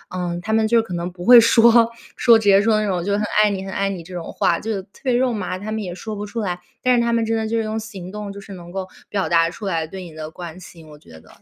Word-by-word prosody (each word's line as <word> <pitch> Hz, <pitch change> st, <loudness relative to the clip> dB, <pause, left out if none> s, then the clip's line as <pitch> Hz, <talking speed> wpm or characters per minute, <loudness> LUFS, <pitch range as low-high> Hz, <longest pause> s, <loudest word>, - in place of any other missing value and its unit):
嗯， 175 Hz, -1 st, -3 dB
她 220 Hz, +4 st, -3 dB
们 220 Hz, 0 st, +3 dB
就 230 Hz, 0 st, +3 dB
可 185 Hz, -, -8 dB
能 175 Hz, +1 st, -3 dB
不 175 Hz, 0 st, -9 dB
会 245 Hz, -1 st, +10 dB
说 230 Hz, 0 st, +5 dB, 0.3 s
说 235 Hz, -2 st, +6 dB
直 220 Hz, -, -4 dB
接 195 Hz, 0 st, +6 dB
说 215 Hz, 0 st, +2 dB
那 210 Hz, -, -1 dB
种 180 Hz, -3 st, -1 dB
就 200 Hz, +1 st, -1 dB
很 210 Hz, +1 st, 0 dB, 0.2 s
爱 210 Hz, -, +4 dB
你 195 Hz, -1 st, -4 dB
很 195 Hz, -, -6 dB
爱 195 Hz, 0 st, 0 dB
你 180 Hz, -4 st, -5 dB
这 180 Hz, +2 st, -12 dB
种 175 Hz, -2 st, -6 dB
话， 170 Hz, -, +1 dB
就 210 Hz, -3 st, -3 dB
特 195 Hz, -, -22 dB
别 255 Hz, -2 st, +1 dB
肉 250 Hz, -1 st, +2 dB
麻， 185 Hz, -3 st, -3 dB
她 210 Hz, +3 st, -6 dB
们 220 Hz, 0 st, -2 dB
也 180 Hz, -3 st, -5 dB
说 215 Hz, +3 st, -6 dB
不 205 Hz, 0 st, -5 dB
出 230 Hz, +3 st, -5 dB
来， 180 Hz, -3 st, -3 dB, 0.2 s
但 255 Hz, 0 st, +4 dB
是 235 Hz, -, +3 dB
她 235 Hz, 0 st, +1 dB
们 230 Hz, -1 st, +1 dB
真 225 Hz, 0 st, 0 dB
的 220 Hz, 0 st, -1 dB
就 230 Hz, +1 st, -1 dB
是 225 Hz, -, 0 dB
用 215 Hz, +1 st, -3 dB
行 195 Hz, -5 st, -8 dB
动 210 Hz, -1 st, -6 dB
就 200 Hz, -, -9 dB
是 200 Hz, 0 st, -11 dB
能 175 Hz, -1 st, -10 dB
够 190 Hz, 0 st, -4 dB, 0.2 s
表 195 Hz, -2 st, -1 dB
达 165 Hz, -1 st, +3 dB
出 200 Hz, +5 st, -9 dB
来 165 Hz, -4 st, -1 dB
对 190 Hz, +2 st, -8 dB
你 165 Hz, -3 st, -11 dB
的 155 Hz, 0 st, -7 dB
关 175 Hz, +1 st, -9 dB
心， 165 Hz, -3 st, -14 dB
我 150 Hz, -1 st, -14 dB
觉 80 Hz, -, -15 dB
得， 80 Hz, -, -20 dB
200 Hz, 335 characters per minute, -21 LUFS, 175-220 Hz, 0.3 s, 会